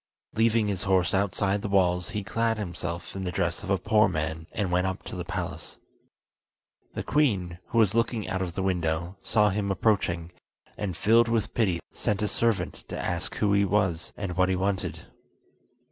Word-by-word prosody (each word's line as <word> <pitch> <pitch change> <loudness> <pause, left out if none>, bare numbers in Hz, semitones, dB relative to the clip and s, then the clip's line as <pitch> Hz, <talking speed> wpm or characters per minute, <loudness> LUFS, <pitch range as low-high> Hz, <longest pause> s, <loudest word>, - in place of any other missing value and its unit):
Leaving 110 -1 +3
his 100 -3 -1
horse 95 -3 +2
outside 100 +1 +1
the 105 - -3
walls, 90 -2 +2
he 105 -2 -3
clad 115 +3 0
himself 90 -3 -5
in 95 - -4
the 90 - -2
dress 85 0 -1
of 100 - -7
a 95 - +3
poor 105 +3 +4
man, 80 +1 -3
and 100 -4 -2
went 90 +1 +2
up 95 - -4
to - - -7
the - - -3
palace. - - -5 1.2
The - - -3
queen, 95 - +1
who - - -3
was 110 -3 +5
looking 115 -2 0
out 95 0 -2
of 90 -2 -3
the 95 - -1
window, 85 -1 -1
saw 105 -2 +3
him 100 0 -1
approaching, 95 -4 +1 0.4
and 95 -4 -3
filled 115 +4 +5
with 115 -2 0
pity 95 -7 +1
sent 105 0 -1
a - - +2
servant 115 +1 0
to - - -5
ask 85 0 -2
who 100 -1 +2
he 100 0 +4
was 95 -4 0
and 95 -3 -4
what 90 0 +3
he 95 - +2
wanted. 95 +1 -1
95 Hz, 190 wpm, -27 LUFS, 90-105 Hz, 1.2 s, was